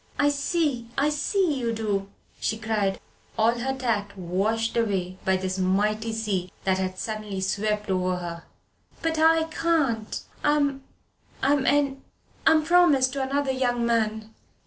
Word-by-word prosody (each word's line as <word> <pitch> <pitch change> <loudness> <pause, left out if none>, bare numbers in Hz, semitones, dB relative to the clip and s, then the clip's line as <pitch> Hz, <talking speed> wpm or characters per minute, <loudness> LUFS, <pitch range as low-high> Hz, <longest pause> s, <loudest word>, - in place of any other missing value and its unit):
"I 290 - +4
see 285 -4 0
I 285 +2 +3
see 300 +1 +1
you 235 -2 -1
do," 205 -3 -2 0.3
she 220 - -1
cried, 215 -3 -1 0.4
all 230 +2 +3
her 265 +2 -2
tact 210 -6 -1
washed 200 +6 -1
away 190 -5 -1
by 190 0 +2
this 185 0 -3
mighty 210 +4 +1
sea 205 -5 -2
that 190 -1 +1
had 185 0 -2
suddenly 215 -2 -4
swept 210 +2 -1
over 185 -1 +1
her. 170 -1 -6 0.6
"But 325 -1 0
I 325 0 +5
can't. 310 -9 0 0.2
I'm 285 -2 +2 0.6
I'm 275 0 +3
en 280 -2 +2 0.5
I'm 320 -1 +6
promised 305 -7 +4
to 275 - -2
another 275 +1 0
young 245 -2 0
man." 220 -1 0
225 Hz, 145 wpm, -25 LUFS, 200-280 Hz, 0.6 s, I'm